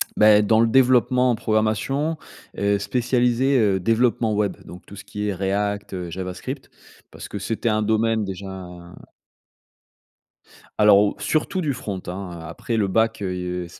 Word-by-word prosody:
Beh, 105 Hz, 0 st, +6 dB
dans 110 Hz, +1 st, +3 dB
le 115 Hz, -, +4 dB
développement 125 Hz, 0 st, +3 dB
en -, -, +1 dB
programmation, 110 Hz, +9 st, 0 dB, 0.4 s
heu, 100 Hz, 0 st, +1 dB
spécialisé, 125 Hz, +3 st, +1 dB
heu, 100 Hz, -3 st, +2 dB
développement 115 Hz, +2 st, +1 dB
web, 105 Hz, -1 st, 0 dB
donc 90 Hz, -, -11 dB
tout 100 Hz, -, -12 dB
ce -, -, -10 dB
qui 105 Hz, 0 st, -5 dB
est 100 Hz, -, -1 dB
React, 100 Hz, +2 st, -2 dB
heu, 90 Hz, -2 st, -5 dB
Javascript, 90 Hz, +1 st, -6 dB, 0.4 s
parce -, -, -9 dB
que 105 Hz, -, -6 dB
c'était 115 Hz, +3 st, -2 dB
un 110 Hz, 0 st, +1 dB
domaine 110 Hz, 0 st, +1 dB
déjà 95 Hz, -1 st, -7 dB, 2.1 s
Alors, 105 Hz, -1 st, +7 dB
o 105 Hz, 0 st, +1 dB
surtout 160 Hz, +4 st, -1 dB
du 145 Hz, -4 st, -1 dB
front, 100 Hz, -6 st, -5 dB
hein, 90 Hz, 0 st, -6 dB
heu, 85 Hz, -, -9 dB
après 115 Hz, +7 st, -4 dB
le 100 Hz, -2 st, +1 dB
back, 110 Hz, +2 st, +1 dB
heu, 90 Hz, -1 st, -3 dB
c -, -, -15 dB
105 Hz, 160 wpm, -22 LUFS, 95-115 Hz, 2.1 s, Alors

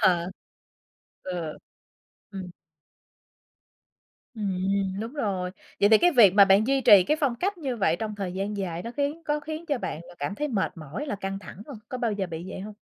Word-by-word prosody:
Ờ. 175 Hz, -1 st, +3 dB, 0.9 s
Ừ, 175 Hz, -4 st, -4 dB, 0.8 s
ừm. 190 Hz, -2 st, -6 dB, 1.9 s
Ừm, 195 Hz, -1 st, -1 dB
đúng 230 Hz, +4 st, -5 dB
rồi. 190 Hz, -9 st, -1 dB, 0.3 s
Vậy 205 Hz, -, +6 dB
thì 220 Hz, 0 st, +7 dB
cái 355 Hz, -1 st, +4 dB
việc 210 Hz, -8 st, +7 dB
mà 200 Hz, -, +9 dB
bạn 195 Hz, +3 st, +4 dB
duy 270 Hz, +1 st, +2 dB
trì 205 Hz, -6 st, +8 dB
cái 305 Hz, -, +2 dB
phong 265 Hz, -5 st, +2 dB
cách 380 Hz, +8 st, -2 dB
như 265 Hz, -7 st, -3 dB
vậy 170 Hz, -6 st, +2 dB
trong 215 Hz, +2 st, -4 dB
thời 195 Hz, -3 st, -4 dB
gian 200 Hz, +3 st, -3 dB
dài 175 Hz, -3 st, -3 dB
nó 235 Hz, -, -5 dB
khiến 290 Hz, +3 st, -1 dB
có 295 Hz, 0 st, 0 dB
khiến 315 Hz, +3 st, -6 dB
cho 285 Hz, -5 st, 0 dB
bạn 160 Hz, -, -4 dB
là -, -, -13 dB
cảm 145 Hz, +8 st, -3 dB
thấy 300 Hz, +6 st, -2 dB
mệt 210 Hz, -7 st, 0 dB
mỏi, 165 Hz, -, -6 dB
là 205 Hz, -, -2 dB
căng 195 Hz, 0 st, -4 dB
thẳng 200 Hz, 0 st, -11 dB
hông? 270 Hz, -7 st, -8 dB
Có 255 Hz, -, -5 dB
bao 230 Hz, -3 st, 0 dB
giờ 195 Hz, -2 st, -2 dB
bị 165 Hz, 0 st, -6 dB
vậy -, -, -6 dB
hông? 210 Hz, +2 st, -8 dB
205 Hz, 205 wpm, -26 LUFS, 185-260 Hz, 1.9 s, mà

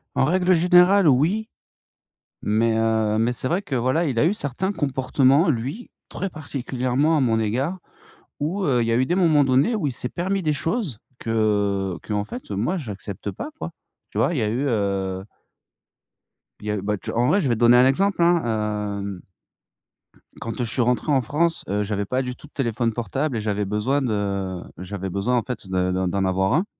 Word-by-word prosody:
En -, -, +3 dB
règle 185 Hz, +4 st, +3 dB
générale, 180 Hz, +2 st, +5 dB
oui, 170 Hz, -, +2 dB, 0.9 s
mais 110 Hz, +2 st, +1 dB
heu, 110 Hz, -1 st, +1 dB
mais 115 Hz, +2 st, +1 dB
c'est 125 Hz, -, -4 dB
vrai 175 Hz, +8 st, 0 dB
que 145 Hz, -9 st, -4 dB
voilà, 130 Hz, +8 st, +1 dB
il 130 Hz, -6 st, 0 dB
a -, -, +4 dB
eu 175 Hz, -, +3 dB
certains 190 Hz, +2 st, -2 dB
comportements, 135 Hz, +1 st, +2 dB
lui, 140 Hz, -, -3 dB, 0.2 s
très 195 Hz, -, -3 dB
particulièrement 140 Hz, -1 st, -1 dB
à -, -, +2 dB
mon 115 Hz, -4 st, +2 dB
égard, 130 Hz, -, -1 dB, 0.6 s
où, 175 Hz, +7 st, -1 dB
heu, 125 Hz, -8 st, +2 dB
il -, -, -1 dB
y -, -, +1 dB
a -, -, +3 dB
eu 130 Hz, +2 st, +3 dB
des 175 Hz, -, 0 dB
moments 160 Hz, -6 st, +4 dB
donnés 135 Hz, -, +3 dB
où 175 Hz, -9 st, -1 dB
il -, -, -1 dB
s'est 125 Hz, 0 st, -4 dB
permis 190 Hz, +2 st, -2 dB
des 155 Hz, -1 st, +1 dB
choses, 160 Hz, -, -2 dB, 0.2 s
que 100 Hz, -4 st, 0 dB
qu'en 105 Hz, -1 st, 0 dB
fait, 105 Hz, +2 st, -8 dB
heu, -, -, -2 dB
moi, 120 Hz, -, 0 dB
j'accepte 100 Hz, -, -6 dB
pas 295 Hz, -, -6 dB
quoi. -, -, -5 dB, 0.4 s
Tu -, -, -7 dB
vois? -, -, +2 dB
Il 155 Hz, -, -2 dB
y -, -, +1 dB
a -, -, +1 dB
eu, 125 Hz, +6 st, -1 dB
heu 100 Hz, -5 st, -1 dB, 1.4 s
il 105 Hz, -, -8 dB
y 105 Hz, -, 0 dB
a -, -, 0 dB
eu, 100 Hz, -, -3 dB
bah 105 Hz, +1 st, -1 dB
tu -, -, -6 dB
en 120 Hz, +2 st, +1 dB
vrai, 195 Hz, -, +3 dB
je 145 Hz, -, 0 dB
vais 120 Hz, -, +2 dB
te 110 Hz, -, -7 dB
donner 120 Hz, +1 st, +6 dB
un 125 Hz, +1 st, +6 dB
exemple, 190 Hz, +6 st, +1 dB
hein, 170 Hz, 0 st, +4 dB, 0.6 s
hem 100 Hz, -2 st, -6 dB, 1.2 s
quand 115 Hz, -1 st, -5 dB
je 125 Hz, -, -1 dB
suis 125 Hz, -, 0 dB
rentré 125 Hz, +5 st, +1 dB
en 135 Hz, -2 st, +4 dB
France, 160 Hz, +8 st, 0 dB
heu, 105 Hz, +1 st, 0 dB
j'avais 100 Hz, 0 st, -2 dB
pas 130 Hz, +6 st, 0 dB
du 125 Hz, -1 st, -4 dB
tout 150 Hz, -, -14 dB
de -, -, -26 dB
téléphone 115 Hz, -3 st, -1 dB
portable 130 Hz, +3 st, -2 dB
et -, -, -2 dB
j'avais 105 Hz, -1 st, -1 dB
besoin 105 Hz, +8 st, 0 dB
de 100 Hz, -6 st, -2 dB, 0.2 s
j'avais 95 Hz, +1 st, -5 dB
besoin 105 Hz, +7 st, 0 dB
en 115 Hz, -, +1 dB
fait 125 Hz, -6 st, -6 dB
de 90 Hz, -1 st, 0 dB
de 95 Hz, 0 st, 0 dB
d'en 95 Hz, +2 st, 0 dB
avoir 95 Hz, +1 st, +1 dB
un 175 Hz, +6 st, +2 dB
125 Hz, 215 wpm, -23 LUFS, 105-155 Hz, 1.4 s, donner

